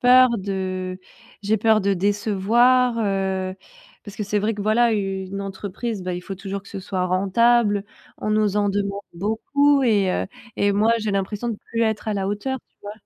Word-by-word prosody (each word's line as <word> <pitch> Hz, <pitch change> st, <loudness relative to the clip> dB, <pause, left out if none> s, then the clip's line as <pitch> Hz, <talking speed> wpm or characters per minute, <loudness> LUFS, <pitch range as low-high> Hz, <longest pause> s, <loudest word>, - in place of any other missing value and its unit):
peur 255 Hz, 0 st, +7 dB
de 185 Hz, -1 st, -3 dB, 0.4 s
j'ai 215 Hz, +1 st, +1 dB
peur 220 Hz, -1 st, +3 dB
de 200 Hz, 0 st, +2 dB
décevoir, 215 Hz, +6 st, +3 dB
heu, 190 Hz, -3 st, -1 dB, 0.5 s
parce 205 Hz, -1 st, -11 dB
que -, -, -3 dB
c'est 210 Hz, +1 st, 0 dB
vrai 215 Hz, +2 st, 0 dB
que, 205 Hz, -, -5 dB
voilà, 225 Hz, +2 st, +3 dB
u 195 Hz, -2 st, -2 dB
une 200 Hz, +1 st, -5 dB
entreprise, 200 Hz, +2 st, -5 dB
bah, 180 Hz, 0 st, -3 dB
il 180 Hz, -, -6 dB
faut 195 Hz, -, -6 dB
toujours 195 Hz, 0 st, -6 dB
que 200 Hz, -, -15 dB
ce 195 Hz, -, -6 dB
soit 185 Hz, -1 st, -2 dB
rentable. 205 Hz, +3 st, +2 dB, 0.3 s
On 215 Hz, -, -3 dB
nous 210 Hz, -1 st, +2 dB
en 205 Hz, -1 st, +2 dB
demande 200 Hz, 0 st, -2 dB
beaucoup 270 Hz, +10 st, +2 dB
et 205 Hz, -6 st, +3 dB
heu -, -, -1 dB, 0.3 s
et 200 Hz, 0 st, +2 dB
moi, 215 Hz, +3 st, +3 dB
j'ai 215 Hz, -2 st, -2 dB
l'impression 200 Hz, +4 st, -2 dB
de 215 Hz, -, -5 dB
plus 230 Hz, 0 st, 0 dB
être 220 Hz, -1 st, -1 dB
à 215 Hz, -, 0 dB
la 195 Hz, -1 st, -1 dB
hauteur, 260 Hz, +6 st, -2 dB
tu -, -, -47 dB
vois? 205 Hz, 0 st, -7 dB
205 Hz, 200 wpm, -22 LUFS, 195-220 Hz, 0.5 s, peur